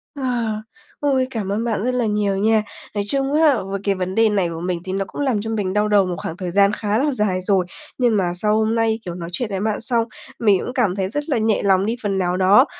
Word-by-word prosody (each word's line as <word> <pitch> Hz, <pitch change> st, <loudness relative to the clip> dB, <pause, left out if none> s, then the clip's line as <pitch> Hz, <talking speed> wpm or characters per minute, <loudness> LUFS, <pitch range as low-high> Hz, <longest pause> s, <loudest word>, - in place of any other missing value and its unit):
Ờ, 275 Hz, -, -6 dB, 0.8 s
ôi! 270 Hz, -3 st, +1 dB
Cảm 210 Hz, -4 st, -3 dB
ơn 215 Hz, +3 st, -1 dB
bạn 225 Hz, -3 st, -1 dB
rất 255 Hz, -, +1 dB
là 245 Hz, -2 st, +1 dB
nhiều 205 Hz, -2 st, 0 dB
nha. 220 Hz, +1 st, +3 dB, 0.3 s
Nói 205 Hz, -, 0 dB
chung 275 Hz, 0 st, 0 dB
á, 300 Hz, -5 st, +4 dB
với 195 Hz, +1 st, -4 dB
cái 200 Hz, -1 st, +1 dB
vấn 185 Hz, 0 st, -3 dB
đề 225 Hz, -1 st, +4 dB
này 195 Hz, -5 st, +1 dB
của 165 Hz, 0 st, -5 dB
mình 180 Hz, 0 st, -2 dB
thì 185 Hz, -, -3 dB
nó 195 Hz, 0 st, -1 dB
cũng -, -, -6 dB
làm 255 Hz, -7 st, +1 dB
cho 225 Hz, -, -5 dB
mình 200 Hz, -4 st, -1 dB
đau 210 Hz, 0 st, +2 dB
đầu 205 Hz, -2 st, +4 dB
một 180 Hz, -, -3 dB
khoảng 165 Hz, -, -5 dB
thời 180 Hz, -2 st, -4 dB
gian 200 Hz, +2 st, +4 dB
khá 210 Hz, 0 st, -1 dB
là 290 Hz, +3 st, +1 dB
dài 205 Hz, -6 st, 0 dB
rồi. 185 Hz, -1 st, +2 dB, 0.3 s
Nhưng 240 Hz, -4 st, +3 dB
mà 175 Hz, -2 st, 0 dB
sau 210 Hz, +3 st, +1 dB
hôm 220 Hz, +1 st, +1 dB
nay, 225 Hz, 0 st, +1 dB
kiểu, 175 Hz, -, -5 dB
nói 170 Hz, -1 st, -6 dB
chuyện 240 Hz, 0 st, -2 dB
với 195 Hz, -1 st, -2 dB
bạn 215 Hz, +1 st, -1 dB
xong, 235 Hz, -1 st, +1 dB, 0.4 s
mình 205 Hz, -5 st, +4 dB
cũng 250 Hz, -, -5 dB
cảm 210 Hz, -8 st, +1 dB
thấy 190 Hz, -1 st, -1 dB
rất 295 Hz, +6 st, -4 dB
là 270 Hz, -, +2 dB
nhẹ 220 Hz, -1 st, +1 dB
lòng 195 Hz, -1 st, +3 dB
đi 230 Hz, +2 st, 0 dB
phần 195 Hz, -2 st, 0 dB
nào 180 Hz, -1 st, 0 dB
đó. 200 Hz, +7 st, +6 dB
210 Hz, 270 wpm, -21 LUFS, 190-230 Hz, 0.8 s, đó